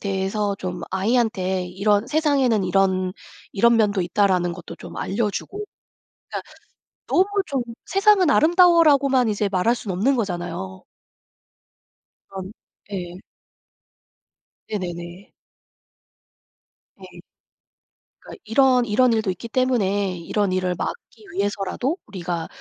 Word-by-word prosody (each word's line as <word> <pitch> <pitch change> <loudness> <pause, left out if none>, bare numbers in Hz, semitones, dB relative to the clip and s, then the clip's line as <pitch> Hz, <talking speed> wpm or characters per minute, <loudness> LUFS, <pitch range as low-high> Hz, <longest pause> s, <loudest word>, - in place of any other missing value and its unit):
대해서 200 +1 -1
좀 180 -1 -5
아이한테 190 -3 0
이런 200 +4 +1
"세상에는 275 -9 +2
이런 185 0 +1 0.4
이런 235 +3 +4
면도 205 -3 +2
있다."라는 180 -1 +1
것도 170 -1 -9
좀 - - -11
알려주고. 225 - -3 0.6
그러니까 - - -7 0.5
너무 370 +2 +3 0.2
좀 270 -3 -1 0.2
"세상은 390 -4 +4
아름다워."라고만 305 -6 +5
이제 205 -1 0
말할 190 +6 +2
순 215 -5 -5
없는 230 +10 +1
거잖아요. 175 - -4 1.5
그런 190 0 -7 0.4
예. 180 -2 -5 1.5
네네네. 175 -1 -6 1.7
네. - - -13 1.0
그러니까 - - -12
"이런 250 +2 +4
이런 240 +3 +3
일도 220 -3 0
있기 210 +5 -7
때문에 205 -7 0
이런 195 +4 -1
일을 185 -1 0
막기 440 -2 -6
위해서라도 205 - -2
우리가 175 -3 -4
205 Hz, 250 characters per minute, -22 LUFS, 185-250 Hz, 1.7 s, 아름다워."라고만